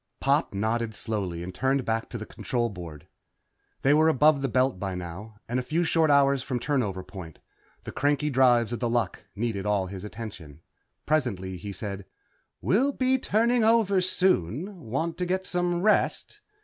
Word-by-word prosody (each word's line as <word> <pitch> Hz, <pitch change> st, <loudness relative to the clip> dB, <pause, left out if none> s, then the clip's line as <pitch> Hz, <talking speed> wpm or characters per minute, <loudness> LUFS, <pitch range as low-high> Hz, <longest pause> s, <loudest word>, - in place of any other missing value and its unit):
Pop -, -, +2 dB
nodded 110 Hz, +2 st, -1 dB
slowly 95 Hz, -7 st, -3 dB
and 90 Hz, +1 st, -7 dB
turned 130 Hz, +4 st, 0 dB
back 115 Hz, 0 st, -1 dB
to 120 Hz, -, -5 dB
the 110 Hz, -, -6 dB
control 120 Hz, +1 st, -2 dB
board. 85 Hz, -7 st, -9 dB, 0.8 s
They 140 Hz, -, +5 dB
were 155 Hz, +2 st, +5 dB
above 150 Hz, 0 st, +4 dB
the 135 Hz, -, 0 dB
Belt 130 Hz, -3 st, +1 dB
by 95 Hz, -1 st, -3 dB
now, 90 Hz, +5 st, -7 dB
and 120 Hz, +2 st, -1 dB
a -, -, 0 dB
few 160 Hz, +7 st, 0 dB
short 160 Hz, -2 st, +2 dB
hours 140 Hz, -1 st, +4 dB
from 130 Hz, -1 st, -3 dB
turnover 120 Hz, -8 st, -1 dB
point. 90 Hz, -4 st, -10 dB, 0.5 s
The -, -, -7 dB
cranky 145 Hz, +2 st, 0 dB
drives 125 Hz, -3 st, +4 dB
of 120 Hz, -, -3 dB
The 120 Hz, -, 0 dB
Luck 115 Hz, -6 st, -1 dB
needed 105 Hz, -2 st, -2 dB
all 100 Hz, -2 st, +1 dB
his 95 Hz, 0 st, -8 dB
attention. 100 Hz, -9 st, -9 dB, 0.4 s
Presently 105 Hz, -12 st, -1 dB
he 100 Hz, +4 st, -7 dB
said, 100 Hz, 0 st, -6 dB, 0.6 s
"We'll 265 Hz, +9 st, +2 dB
be 260 Hz, 0 st, +1 dB
turning 235 Hz, +1 st, +2 dB
over 220 Hz, -4 st, +4 dB
soon. 180 Hz, -, 0 dB
Want 165 Hz, +7 st, -2 dB
to 180 Hz, -, 0 dB
get 185 Hz, +1 st, -1 dB
some 175 Hz, 0 st, -1 dB
rest?" 215 Hz, -, +1 dB
125 Hz, 175 wpm, -27 LUFS, 100-160 Hz, 0.8 s, They